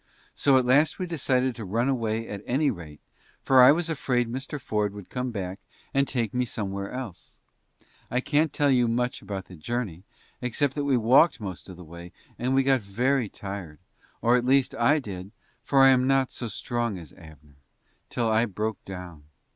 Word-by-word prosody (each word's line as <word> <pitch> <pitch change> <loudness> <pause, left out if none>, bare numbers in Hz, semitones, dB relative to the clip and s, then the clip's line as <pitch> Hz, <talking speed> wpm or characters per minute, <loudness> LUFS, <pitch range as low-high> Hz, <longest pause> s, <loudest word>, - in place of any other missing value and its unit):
So 135 -2 +4
at 130 - +2
last 145 +5 +4
we 185 - -3
decided 130 -6 0
to 115 - -8
run 115 +6 0
away 115 -4 -1
at 100 -1 -6
any 140 +4 +2
rate, 75 -4 -10 0.4
for 130 -1 +6
I 125 - +9
was 165 +2 +1
afraid 125 -6 0
Mr. 135 +4 -5
Ford 105 -4 -1
would 100 -3 -11
come 125 0 -2
back 95 -4 -5 0.3
and 140 0 +2
take 115 -5 -1
me 125 0 +1
somewhere 100 -4 -4
else. 125 -9 -8 0.7
I 125 - +1
can't 150 +3 +1
tell 145 -1 +2
you 125 -2 +3
much 125 +2 -1
about 95 -2 -6
the 90 - -12
journey, 95 0 -4 0.4
except 130 +3 0
that 145 0 -2
we 135 -3 +3
walked 130 +9 +4
most 95 -3 -7
of 90 - -10
the 90 - -10
way, 85 +2 -11 0.3
and 130 +2 0
we 135 - +4
got 135 -2 +3
very 120 +4 0
tired 95 -7 -7 0.5
or, 120 +1 +5
at 125 - +2
least, 130 +1 +3
I 130 +6 +3
did, 95 -8 -6 0.3
for 135 -1 +4
I 135 - +8
am 130 -1 +4
not 135 -1 +2
so 120 - -5
strong 120 -1 -3
as 80 -4 -11
Abner 75 -3 -16 0.5
till 120 -2 -1
I 110 +1 +3
broke 105 0 -4
down. 90 -5 -9
120 Hz, 195 wpm, -26 LUFS, 100-130 Hz, 0.7 s, I